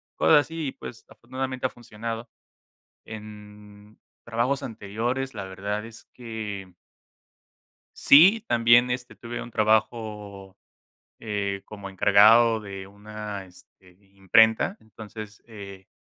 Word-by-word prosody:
cosas 150 -2 +5
así, 160 0 -5
y - - -3
pues, 115 - -11
afortunadamente 130 +1 -5
ha - - +2
funcionado. 115 0 -7 0.8
En 105 -1 -12 0.3
trabajos 120 +4 -1
anteriores, 120 +5 -4
la 100 -3 -5
verdad 100 +3 -4
es 115 0 -12
que 105 -5 -7 1.2
sí, 190 +10 +6
también, 120 +1 +4
este, 125 -2 -4
tuve 120 +2 -7
un 120 - -11
trabajo, 105 -3 -1 0.6
eh, 100 -3 -3
como 100 -2 -9
encargado 110 +4 +5
de 95 -2 -8
una, 105 0 -8
este, 90 0 -20 0.2
imprenta, 110 - +3
entonces, 110 -1 -11
eh, 100 -4 -11
110 Hz, 110 wpm, -25 LUFS, 100-120 Hz, 1.2 s, sí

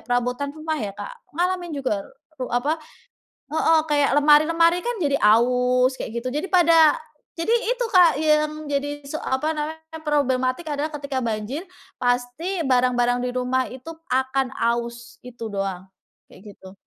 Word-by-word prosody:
perabotan 245 +3 -1
rumah 310 0 -3
ya, 200 -2 -4
Kak. 205 - -7 0.2
Ngalamin 350 -3 -1
juga 255 -7 -1 0.4
ru 255 - -2
apa 285 +7 0 0.7
heeh, 320 0 +4
kayak 290 -2 +2
lemari-lemari 330 +4 +4
kan 480 -1 -2
jadi 285 -5 +1
aus 250 +4 +4
kayak 235 -2 -5
gitu 255 +2 -4
jadi 315 +6 -2
pada 330 -4 +5 0.4
jadi 335 +7 0
itu, 480 +1 +1
Kak, 350 -6 +6
yang 305 0 +1
jadi 290 0 -3
se 295 +3 -5
apa 285 +5 -1
namanya, 320 +1 -6
problematik 265 -1 0
adalah 290 +2 -1
ketika 280 -3 -4
banjir 230 +7 -3 0.4
pasti 250 +9 -1
barang-barang 245 -1 +2
di 250 - -1
rumah 255 +1 -1
itu 260 +6 -9 0.2
akan 260 +1 0
aus, 235 0 -3
itu 245 -2 -9
doang, 195 -2 -3 0.5
kayak 205 +1 -13
gitu. 190 0 -13
280 Hz, 145 wpm, -23 LUFS, 245-315 Hz, 0.7 s, Kak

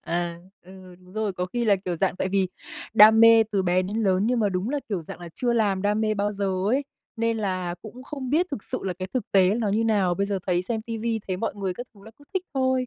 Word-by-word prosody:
ờ, 170 0 -2 0.3
ừ, 185 0 -13
đúng 180 0 -18
rồi, 215 -2 -1
có 180 0 -3
khi 240 +5 -2
là, 205 -2 +4
kiểu 185 -2 -4
dạng, 185 +1 0
tại 190 - -1
vì 190 -1 +1 0.5
đam 220 +1 +8
mê 230 0 +8
từ 195 - +2
bé 180 0 +2
đến 200 +4 -4
lớn, 190 0 +2
nhưng 245 0 +1
mà 210 - +2
đúng 190 +5 -2
là, 290 - 0
kiểu 190 -6 -2
dạng 160 - -10
là, 175 - -8
chưa 240 -1 0
làm 205 -5 +1
đam 210 +1 +1
mê 215 -1 +1
bao 205 0 -1
giờ 200 -1 -3 0.2
ấy, 265 +6 +1 0.3
nên 230 0 0
là 185 -4 -2
cũng 240 +4 -10
không 270 -2 -6
biết 335 +5 +3
thực 250 -8 -5
sự - - -3
là 190 - -1
cái 185 0 -4
thực 250 -5 0
tế 190 0 +5
nó 225 -2 -1
như 215 +3 +1
nào, 200 -5 +2
bây 200 +2 -1
giờ 200 -1 -1
thấy 180 -1 +1
xem 220 +3 -2
ti 230 -1 -4
vi 225 0 -1
thấy 185 - -1
mọi 225 - -3
người 195 -3 -3
các 245 +4 -7
thứ 200 - -18
là 220 - -11
cứ 285 - -18
thích 380 - 0
thôi. 260 -1 +1
205 Hz, 280 wpm, -25 LUFS, 185-230 Hz, 0.5 s, đam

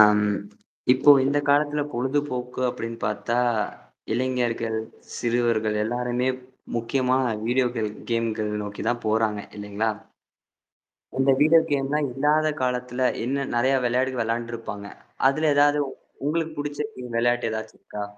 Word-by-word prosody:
ஆம். 105 0 +7 0.7
இப்போ 130 +3 +5
இந்த 140 +2 +2
காலத்துல 145 +1 +3
பொழுதுபோக்கு 125 -1 -2
அப்டின்னு 115 -1 -5
பார்த்தா, 105 +2 -1 0.8
இளைஞர்கள், 120 -2 0 0.4
சிறுவர்கள் 115 -3 +1
எல்லாருமே 125 +2 -1 0.5
முக்கியமான 130 +2 +1 0.2
வீடியோக்கள் 120 -3 +1 0.2
கேம்கள 115 -2 0 0.2
நோக்கி 105 0 -6
தான் 120 0 -1
போறாங்க 110 -1 +1 0.2
இல்லைங்களா? 105 +2 -1 1.3
இந்த 135 0 +5
வீடியோ 160 +2 +7
கேம்லாம் 140 +1 +1
இல்லாத 150 +4 +2
காலத்துல 125 0 -1 0.2
என்ன 135 +3 -1
நெறைய 130 +3 +3
வெளையாடு 130 +2 +1
வெளையாண்டுருப்பாங்க. 115 -3 -4 0.4
அதுல 155 +3 +2
ஏதாவது 145 +1 +5 0.5
உங்களுக்கு 160 +1 0
புடிச்ச 145 0 -4
கேம் 125 -2 -6
வெளையாட்டு 120 +1 +2
ஏதாச்சும் 110 0 -6
இருக்கா? 105 -1 -6
125 Hz, 110 wpm, -25 LUFS, 115-135 Hz, 1.3 s, ஆம்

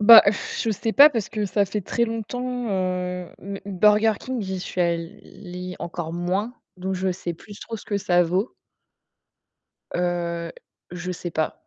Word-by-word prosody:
Bah, 220 +2 +11 0.4
je 225 - +1
sais 220 +2 -1
pas, 290 +2 +10
parce 230 -8 -2
que 210 -2 -2
ça 200 +1 +2
fait 205 +2 -3
très 235 +5 0
longtemps, 245 +2 -3
heu, 180 -2 -1
m 200 +1 -6
m 195 -3 -6
Burger 210 +2 +5
King, 255 -4 -3
j'y 190 -1 -3
suis 185 -1 -4
allée 180 +2 -3
encore 165 -1 -4
moins 185 +7 -1 0.2
donc 190 +1 -2
je 185 0 0
sais 175 0 -4
plus 205 +5 -13
trop 225 - -5
ce - - -12
que 205 - -1
ça 175 -3 +3
vaut. 185 +7 -1 1.4
Heu, 170 -1 -1 0.4
je 180 +1 -4
sais 175 0 -5
pas. 155 -1 -2
190 Hz, 170 wpm, -24 LUFS, 175-215 Hz, 1.4 s, Bah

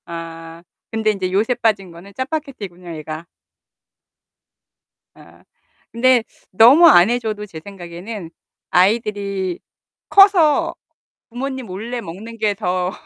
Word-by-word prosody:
아. 165 0 -9 0.3
근데 220 -1 +1
인제 190 -3 -3
요새 215 +6 +1
빠진 210 -6 0
거는 175 +4 -14
짜파게티군요, 260 - -6
애가. 155 +2 -7 1.9
아. - - -19 0.5
근데 245 0 +3 0.3
너무 250 - +7
안 185 - +7
해 245 +1 +1
줘도 215 -3 -4
제 170 -6 -10
생각에는 185 0 -8 0.4
아이들이 200 -1 0 0.5
커서 380 -7 +5 0.6
부모님 260 +1 -5
몰래 225 +6 -5
먹는 220 +6 -9
게 215 -2 +1
더 180 -1 -2
205 Hz, 220 characters per minute, -19 LUFS, 180-235 Hz, 1.9 s, 너무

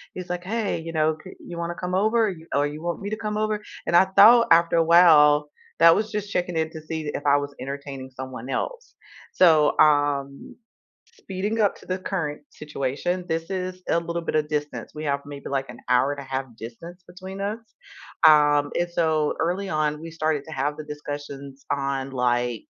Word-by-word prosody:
he's 180 -1 -7
like, 180 0 -3
"Hey, 215 -1 -2
you 165 0 -7
know, 155 -1 +1
c 190 - -10
you 170 -1 -9
want 170 0 -3
to 175 - -4
come 180 0 -4
over? 220 +3 +2
you 165 -2 -12
or 145 +1 +3
you 150 +2 -5
want 170 0 -3
me 205 +1 -6
to 215 - -2
come 210 -1 -3
over?" 215 -1 -1 0.2
And 170 - 0
I 185 - +7
thought 210 +5 +7
after 170 0 +5
a 165 - +4
while, 150 -3 +6 0.3
that 165 0 +7
was 215 0 -1
just 210 -1 -4
checking 175 -3 -1
in 160 0 -1
to 160 - -8
see 155 -1 -4
if 145 - -5
I 140 - +5
was 145 0 -4
entertaining 135 -1 -6
someone 130 -1 -8
else, - - -4 0.4
so, 155 -5 +4
um, 145 -2 +2 0.7
speeding 205 - -3
up 205 -2 +3
to - - -16
the 185 0 -2
current 160 -6 -3
situation, 150 +5 -3
this 165 +2 -3
is 185 -1 -4
a - - +2
little 170 0 -3
bit 165 - -2
of 150 -1 0
distance, 150 -1 -4
we 155 - -6
have 140 -1 0
maybe 145 -1 -8
like 135 -1 -2
an - - -10
hour 125 +3 +3
and 145 - -6
a - - -7
half 135 0 -3
distance 165 +11 -10
between 190 +2 -9
us, 205 +3 -2 0.7
um, 145 -1 +5
and 175 0 0
so 160 -3 +1
early 180 +4 -1
on, 150 -2 -1
we 165 +1 -8
started 155 -3 -1
to 160 - -11
have 145 +1 -2
the 155 - -7
discussions 145 -2 -8
on 135 -1 -2
like 120 -2 0
160 Hz, 205 wpm, -24 LUFS, 145-180 Hz, 0.7 s, I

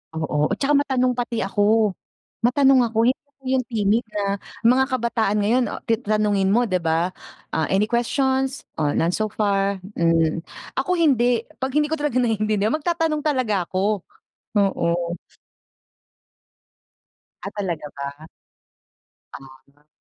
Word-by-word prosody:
Oo, 160 -2 -2
at 200 - 0
saka 285 +2 +2
matanong 255 -3 +1
pati 240 -3 -2
ako. 210 +2 +2 0.5
Matanong 265 +2 +5
ako. 225 - -7
Hindi 255 - +1
ako 285 -1 -38
yung 255 -2 0
timid 220 0 +1
na 205 - 0 0.4
mga 255 +3 +5
kabataan 230 -4 0
ngayon, 240 +5 +3
ah, - - -6
ti 225 0 0
tanungin 210 -3 +1
mo, 240 +3 +4
'di 185 -6 0
ba, 165 +2 0 0.4
"Ah, 160 -2 0
any 200 +3 +2
questions? 265 +3 0 0.2
Oh, 150 -2 +1
none 170 +2 +2
so 215 +3 -1
far," 200 -2 0 0.2
mm. 165 -1 +2 0.4
Ako 320 +7 0
hindi. 245 -8 +3 0.2
'Pag 265 0 -2
hindi 300 0 +2
ko 320 - 0
talaga 295 -4 -1
naiintindihan 215 -2 +1
magtatanong 320 -1 0
talaga 230 - 0
ako, 200 +2 0 0.6
oo. 170 -3 0 2.3
Ah, - - -4
talaga 175 -7 -3
ba? 140 +3 -7 1.1
Ah. 135 +2 -15
215 Hz, 135 wpm, -22 LUFS, 185-255 Hz, 2.3 s, Matanong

